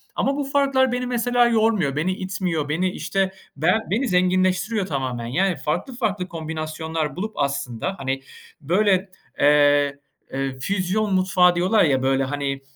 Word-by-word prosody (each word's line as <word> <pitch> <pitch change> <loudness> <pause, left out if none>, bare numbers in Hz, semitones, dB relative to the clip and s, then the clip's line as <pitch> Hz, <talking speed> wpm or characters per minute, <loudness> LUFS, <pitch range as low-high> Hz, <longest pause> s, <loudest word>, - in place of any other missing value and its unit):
Ama 275 - 0
bu 290 - -1
farklar 275 -2 +2
beni 250 0 -1
mesela 245 0 +2
yormuyor, 220 - +2
beni 160 +5 0
itmiyor, 185 -6 -3
beni 180 +5 0
işte, 195 0 -1 0.3
ben 175 +9 +3
beni 245 +7 +1
zenginleştiriyor 185 +3 +1
tamamen. 130 -7 -3
Yani, 180 +9 +1
farklı 240 - -3
farklı 205 -6 -2
kombinasyonlar 160 -2 -4
bulup 215 +5 -4
aslında, 140 - -2
hani 135 0 -2 0.4
böyle, 190 +4 +2 0.3
eee, 145 -1 +4 0.3
eee, 135 -1 -3
füzyon 195 +5 -1
mutfağı 185 -1 +4
diyorlar 185 +5 +3
ya 135 -4 +2
böyle 135 0 +2
hani, 140 0 -3
180 Hz, 140 wpm, -22 LUFS, 145-205 Hz, 0.4 s, eee